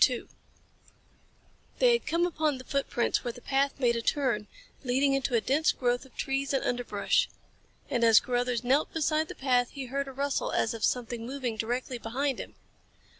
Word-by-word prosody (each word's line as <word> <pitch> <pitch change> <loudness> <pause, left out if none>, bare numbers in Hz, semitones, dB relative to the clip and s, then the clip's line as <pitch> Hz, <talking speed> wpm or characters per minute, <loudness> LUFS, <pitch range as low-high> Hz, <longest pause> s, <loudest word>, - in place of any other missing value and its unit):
They - - +5
had 470 - -1
come 340 +1 +2
upon 310 -5 0
the 255 - -9
footprints 275 -3 0
where 240 - -3
the - - -11
path 275 +2 0
made 240 -3 +3
a 230 - -1
turn, 235 -6 0 0.4
leading 270 +2 +2
into 270 -2 0
a 230 - +3
dense 300 +6 +2
growth 245 +1 -1
of 265 - -19
trees 275 0 -1
and 270 - 0
underbrush. 245 - +1 0.6
And 240 -3 0
as 225 -1 +8
Carruthers 245 -1 -1
knelt 270 +5 +2
beside 315 0 +1
the - - -8
path 250 -2 +2
he 275 -2 -5
heard 275 +2 -2
a - - -6
rustle 280 +1 -1
as 220 - +1
of 225 -2 -6
something 240 -2 0
moving 255 -3 -3
directly 245 +3 -3
behind 260 +4 -2
him. - - -8
260 Hz, 175 wpm, -29 LUFS, 240-280 Hz, 0.6 s, as